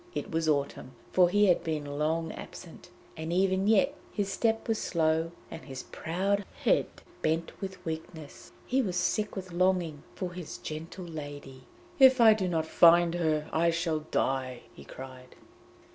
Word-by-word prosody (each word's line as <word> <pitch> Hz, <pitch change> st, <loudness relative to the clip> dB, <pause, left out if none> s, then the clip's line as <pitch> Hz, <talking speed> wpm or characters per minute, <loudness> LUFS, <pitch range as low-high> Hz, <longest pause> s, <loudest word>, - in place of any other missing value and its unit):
It -, -, -4 dB
was 160 Hz, -1 st, 0 dB
autumn, 140 Hz, -3 st, -1 dB, 0.2 s
for 180 Hz, -1 st, +5 dB
he 205 Hz, +3 st, +4 dB
had 180 Hz, -3 st, +3 dB
been 155 Hz, -2 st, -2 dB
long 160 Hz, +2 st, 0 dB
absent, -, -, -11 dB, 0.3 s
and 160 Hz, +1 st, -5 dB
even 190 Hz, +2 st, +2 dB
yet 225 Hz, +6 st, +4 dB, 0.2 s
his 200 Hz, -2 st, -2 dB
step 225 Hz, -1 st, 0 dB
was 225 Hz, -1 st, 0 dB
slow 160 Hz, -1 st, +1 dB, 0.2 s
and 160 Hz, -, -7 dB
his 135 Hz, -2 st, -7 dB
proud 195 Hz, +5 st, -1 dB, 0.2 s
head -, -, +3 dB, 0.3 s
bent 165 Hz, +5 st, -1 dB
with 190 Hz, -1 st, -7 dB
weakness. 160 Hz, -1 st, -7 dB
He 265 Hz, +1 st, +1 dB
was 190 Hz, -7 st, -2 dB
sick 210 Hz, +4 st, 0 dB
with 185 Hz, -2 st, -6 dB
longing 175 Hz, -4 st, +1 dB
for 180 Hz, -3 st, -4 dB
his 180 Hz, -3 st, -7 dB
gentle 165 Hz, +4 st, -7 dB
lady; 145 Hz, -5 st, -8 dB, 0.3 s
'If 265 Hz, -1 st, +7 dB
I 225 Hz, -2 st, +8 dB
do 200 Hz, -3 st, -1 dB
not 165 Hz, -3 st, 0 dB
find 170 Hz, +1 st, +5 dB
her, 155 Hz, -3 st, 0 dB
I 170 Hz, +1 st, +3 dB
shall 165 Hz, -1 st, 0 dB
die!' 130 Hz, -2 st, -1 dB
he -, -, -13 dB
cried. 130 Hz, -1 st, -11 dB
170 Hz, 160 wpm, -29 LUFS, 155-190 Hz, 0.3 s, I